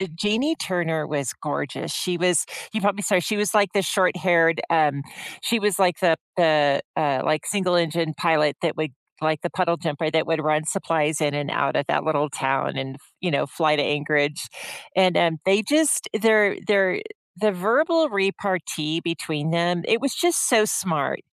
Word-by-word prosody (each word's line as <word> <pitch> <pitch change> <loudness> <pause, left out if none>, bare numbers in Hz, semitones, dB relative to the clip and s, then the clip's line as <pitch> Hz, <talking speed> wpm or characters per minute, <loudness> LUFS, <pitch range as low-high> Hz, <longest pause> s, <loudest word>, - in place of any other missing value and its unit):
Jeanie 225 - 0
Turner 165 -4 -2
was 140 -4 -2
gorgeous. 145 -3 -4
She 180 -1 -2
was 180 -2 +2 0.3
you 220 - -2
probably 205 0 0
saw 200 - +2
her. 180 - +3
She 210 +5 -2
was, 210 +1 0
like, 205 -2 +3
the 200 - +2
short-haired 180 -3 +2
um 150 -4 +2 0.4
she 235 -1 +1
was 205 -3 0
like 180 -4 +2
the 170 -3 +4 0.2
the, 150 -5 +3 0.2
uh, 140 -4 +1
like, 155 -1 0
single-engine 170 -4 0
pilot 150 -4 +2
that 165 -3 -1
would, 155 -2 -2 0.3
like, 155 -1 0
the 175 - -1
puddle-jumper 165 -3 -1
that 160 0 +1
would 160 -1 -1
run 155 0 +1
supplies 160 -3 -1
in 145 -1 +1
and 145 0 -3
out 140 - 0
of 145 - 0
that - - 0
little 150 -2 0
town 135 0 -1
and, 135 0 -5 0.2
you 180 -2 -1
know, 140 - +1
fly 150 +2 +1
to 145 - +1
Anchorage. 145 +1 0 0.5
And, 185 -2 +4
um, 165 -2 +2
they 195 +2 +4
just 305 +2 +2
their 215 -3 +4
their 195 - +2 0.4
the 215 +2 +2
verbal 305 - +2
repartee 185 - -1
between 160 -2 -3
them, 170 0 0
it 230 - +2
was 275 -1 -1
just 350 -1 +2
so 220 -4 +5
smart. 160 -8 -1
170 Hz, 175 wpm, -23 LUFS, 155-195 Hz, 0.5 s, so